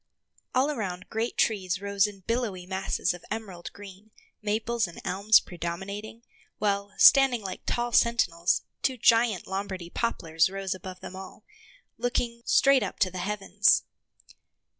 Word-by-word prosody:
All 270 +4 +3
around 190 -8 -5
great 225 +2 -2
trees 190 -4 +1
rose 200 0 +1
in 200 -2 -11
billowy 215 -4 -2
masses 190 -1 -1
of 175 - -11
emerald 200 -6 -6
green, 205 +1 -13 0.3
maples 220 +1 0
and 170 - -11
elms 200 +4 +5
predominating; 195 +6 -6 0.3
while, 200 -1 -1
standing 270 -5 +6
like 185 -2 -6
tall 240 0 -1
sentinels, 180 -8 +2 0.2
two 260 -2 0
giant 230 -4 +3
Lombardy 190 -3 -5
poplars 165 -7 0
rose 195 0 -3
above 185 0 -9
them 185 - -8
all, 190 0 -10 0.6
looking 240 -1 -1
straight 275 -1 +5
up - - -4
to 185 - +1
the 185 - -6
heavens. 200 +1 +2
200 Hz, 140 wpm, -27 LUFS, 185-230 Hz, 0.6 s, standing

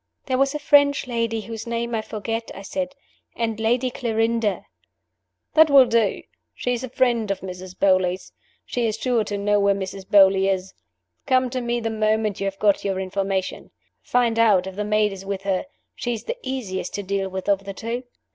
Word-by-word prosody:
"There 260 -1 0
was 275 +1 +2
a - - +1
French 285 -1 +4
lady 230 -2 -1
whose 225 +1 -7
name 235 0 -2
I 220 - 0
forget," 225 +1 -4
I 195 - -8
said, 275 +6 -4 0.4
"and 225 -2 -2
Lady 245 +3 +1
Clarinda 225 -3 0 0.4
" - - -55
"That 315 0 +6
will 275 -2 +8
do! 230 -4 +1 0.3
She 245 - -1
is 240 +1 -3
a 260 - -5
friend 235 -4 +1
of 195 -1 -2
Mrs. 185 0 -8
Beauly's. 185 -1 +2 0.3
She 240 -2 -1
is 215 0 -2
sure 240 -2 +1
to 205 0 -3
know 205 +1 +2
where 200 0 +3
Mrs. 190 0 -6
Beauly 195 -1 +6
is. 190 0 -3 0.5
Come 255 -2 +2
to 255 -1 -2
me 240 0 -1
the 225 -1 -2
moment 215 -1 0
you - - 0
have 195 0 -3
got 205 -1 +2
your 195 -1 -1
information. 190 0 -2 0.3
Find 235 -2 +1
out 205 -5 +4
if 190 -1 -7
the 210 - -2
maid 210 0 +2
is 195 -1 -8
with 195 0 -4
her: 195 +2 0 0.3
she 240 -1 -3
is 220 - -8
the 485 - -4
easiest 245 - -4
to 205 - -3
deal 195 0 -2
with 190 0 -5
of 195 -1 +1
the 195 - -5
two. 230 +3 -3
220 Hz, 205 wpm, -23 LUFS, 195-240 Hz, 0.5 s, will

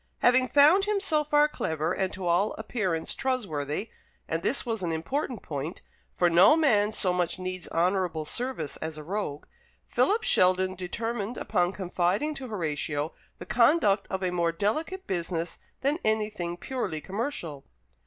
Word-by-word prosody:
Having 255 +1 +5
found 305 +9 +6
him, 415 -1 +1
so 315 -6 +1
far, 295 0 +4
clever, 160 - -2
and 190 -1 -1
to 185 -1 -5
all 175 +5 +2
appearance 190 -7 -2
trustworthy 200 - -2 0.4
and 165 +1 -1
this 270 +10 0
was 225 -4 -2
an 175 -2 -1
important 235 - -3
point, 150 +3 -5 0.3
for 175 - +3
no 180 - +6
man 215 -10 +3
so 185 -4 +1
much 180 -1 0
needs 185 -1 -5
honourable 175 -2 0
service 240 - -3
as 160 -1 -5
a 155 - -7
rogue 170 -4 -3 0.4
Philip 435 +3 +2
Sheldon 185 +1 +3
determined 215 +5 -3
upon 180 -4 +1
confiding 190 - 0
to 270 -3 -7
Horatio 155 - -2 0.2
the - - -8
conduct 225 -3 +3
of 190 -1 -3
a 180 - +1
more 170 -1 +1
delicate 310 - -2
business 170 -2 -3 0.2
than 285 +5 +1
anything 210 -5 -1
purely 235 -7 -3
commercial. 185 - -4
190 Hz, 155 wpm, -28 LUFS, 170-245 Hz, 0.4 s, found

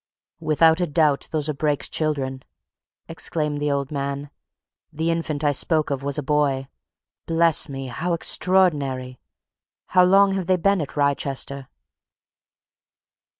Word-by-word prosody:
"Without 160 +2 +3
a 175 - +1
doubt 150 -2 +1
those 155 -2 -1
are 155 - -1
Brake's 145 0 -1
children!" 135 -4 -2 0.7
exclaimed 150 -2 -2
the 150 - 0
old 140 0 -2
man. 140 0 -4 0.6
"The 160 +2 -1
infant 160 -3 -2
I 145 - +3
spoke 155 +2 +1
of 140 -1 -2
was 140 0 -1
a 150 - -2
boy. 140 -2 0 0.6
Bless 165 -1 +2
me! 135 -1 -6
how 160 +8 -3
extraordinary. 145 -8 +1 0.7
How 180 -1 +5
long 195 +2 +5
have 190 -2 -2
they 185 -1 +3
been 195 +1 +2
at 150 - -7
Wrychester?" 140 -1 -1
150 Hz, 135 wpm, -23 LUFS, 140-165 Hz, 0.7 s, How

